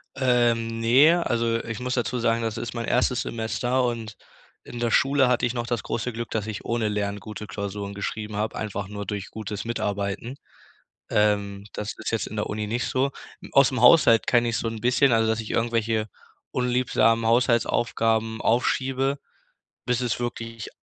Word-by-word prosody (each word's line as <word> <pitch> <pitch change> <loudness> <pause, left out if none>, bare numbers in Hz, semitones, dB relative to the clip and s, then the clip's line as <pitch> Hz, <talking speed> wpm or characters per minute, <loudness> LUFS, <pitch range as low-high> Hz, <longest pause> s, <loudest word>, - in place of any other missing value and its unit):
Ähm, 120 -3 +1
ne, 135 +9 +5
also 115 -1 0
ich 115 0 -5
muss 125 0 -2
dazu 125 0 -1
sagen, 115 0 +1
das 115 0 -3
ist 120 - -5
mein 115 -1 -3
1. 125 0 +1
Semester 120 +3 -1
und 115 -3 -3 0.5
in 120 - -8
der 120 -1 0
Schule 135 +1 +4
hatte 125 -1 +2
ich 120 - -1
noch 120 -1 -3
das 120 -2 -2
große 120 +2 -3
Glück, 115 0 -5
dass 110 -1 -2
ich 110 -2 -6
ohne 115 -2 0
Lernen 105 -1 -2
gute 105 +1 -8
Klausuren 100 0 -5
geschrieben 105 +1 -4
habe, 105 +1 -2
einfach 100 -2 -4
nur 100 0 -6
durch 100 0 -5
gutes 105 -2 -5
Mitarbeiten. 105 +1 -3 0.7
Ähm, 100 -1 +1
das 105 0 -4
ist 110 - -4
jetzt 115 - -1
in - - -8
der 105 - -1
Uni 105 0 -3
nicht 120 +3 -1
so. 135 +2 0 0.4
Aus 140 -1 +5
'm 130 - -2
Haushalt 125 -4 +6
kenn 120 -1 +3
ich 115 -1 0
so 115 - -2
'n 115 -1 -5
bisschen, 125 +2 +3
also 115 -1 +3
dass 110 0 0
ich 110 - -5
irgendwelche 115 -2 0 0.4
unliebsamen 125 -2 +2
Haushaltsaufgaben 115 -1 +1
aufschiebe, 135 +3 +1 0.7
bis 125 0 0
es 120 -3 -1
wirklich 115 -2 -5
115 Hz, 180 wpm, -25 LUFS, 110-120 Hz, 0.7 s, Haushalt